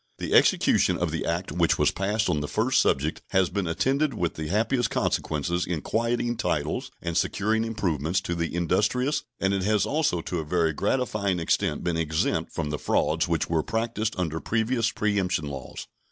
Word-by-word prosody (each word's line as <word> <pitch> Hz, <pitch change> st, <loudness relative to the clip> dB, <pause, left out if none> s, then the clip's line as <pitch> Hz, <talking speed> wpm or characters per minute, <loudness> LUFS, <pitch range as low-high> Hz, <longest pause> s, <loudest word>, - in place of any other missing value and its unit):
The -, -, -3 dB
execution -, -, +4 dB
of -, -, -1 dB
the -, -, -3 dB
act 85 Hz, +3 st, -2 dB
which 85 Hz, -2 st, +2 dB
was -, -, +3 dB
passed 105 Hz, +4 st, 0 dB
on 80 Hz, -5 st, +1 dB
the 75 Hz, -, -3 dB
first 115 Hz, -, +2 dB
subject 75 Hz, +4 st, 0 dB
has 95 Hz, -2 st, +2 dB
been 95 Hz, -2 st, -1 dB
attended 135 Hz, -, +1 dB
with 85 Hz, -5 st, -1 dB
the 80 Hz, -1 st, -5 dB
happiest 115 Hz, -, +1 dB
consequences 85 Hz, +4 st, -1 dB
in 85 Hz, -4 st, -2 dB
quieting 120 Hz, +1 st, -1 dB
titles 75 Hz, -, -1 dB
and 85 Hz, -1 st, -3 dB
securing 110 Hz, +5 st, +1 dB
improvements 90 Hz, -7 st, -1 dB
to 85 Hz, -, -3 dB
the 85 Hz, 0 st, -2 dB
industrious, 125 Hz, -, +1 dB, 0.2 s
and 95 Hz, +1 st, +1 dB
it 100 Hz, -, 0 dB
has 105 Hz, +2 st, +2 dB
also 145 Hz, -, 0 dB
to 90 Hz, +1 st, -3 dB
a -, -, -2 dB
very 80 Hz, 0 st, +1 dB
gratifying 100 Hz, -, 0 dB
extent 80 Hz, -, 0 dB
been 85 Hz, -2 st, 0 dB
exempt 80 Hz, -1 st, 0 dB
from 75 Hz, -2 st, -3 dB
the 75 Hz, -, -3 dB
frauds -, -, +1 dB
which -, -, 0 dB
were 80 Hz, -1 st, +1 dB
practiced 110 Hz, +1 st, -2 dB
under 80 Hz, -3 st, -1 dB
previous 115 Hz, +2 st, 0 dB
preemption 100 Hz, -8 st, 0 dB
laws. 70 Hz, -2 st, -7 dB
95 Hz, 180 wpm, -26 LUFS, 80-110 Hz, 0.2 s, execution